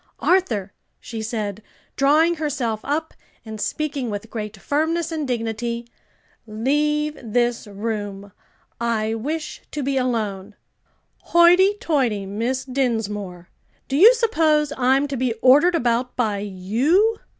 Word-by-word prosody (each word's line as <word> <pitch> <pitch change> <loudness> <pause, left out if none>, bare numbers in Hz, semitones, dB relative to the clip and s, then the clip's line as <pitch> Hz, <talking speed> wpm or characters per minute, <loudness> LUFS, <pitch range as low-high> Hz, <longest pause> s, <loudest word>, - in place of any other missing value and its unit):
"Arthur," 230 - +1 0.3
she 225 -1 -7
said, 215 -2 -4 0.3
drawing 315 +5 +3
herself 255 -8 -2
up, 315 +3 -2 0.3
and 220 -1 -7
speaking 290 -5 -2
with 205 +1 -6
great 210 -2 -5
firmness 320 +3 -1
and 310 -3 -3
dignity, 235 0 -3 0.6
"leave 295 +7 0
this 240 0 -1
room; 205 -1 -5 0.5
I 225 -2 0
wish 300 +8 -4
to 295 - -4
be 275 0 0
alone." 215 -5 -2 0.7
"Hoity 355 +4 +5
toity, 245 -11 0
Miss 230 +7 -2
Dinsmore! 210 -9 -3 0.4
do 270 - -2
you 435 - +8
suppose 315 -11 +2
I'm 265 +2 +2
to 280 - -4
be 250 -1 0
ordered 270 +10 +5
about 245 -3 0
by 215 -5 0
you? 240 - +1
245 Hz, 120 wpm, -22 LUFS, 220-300 Hz, 0.7 s, you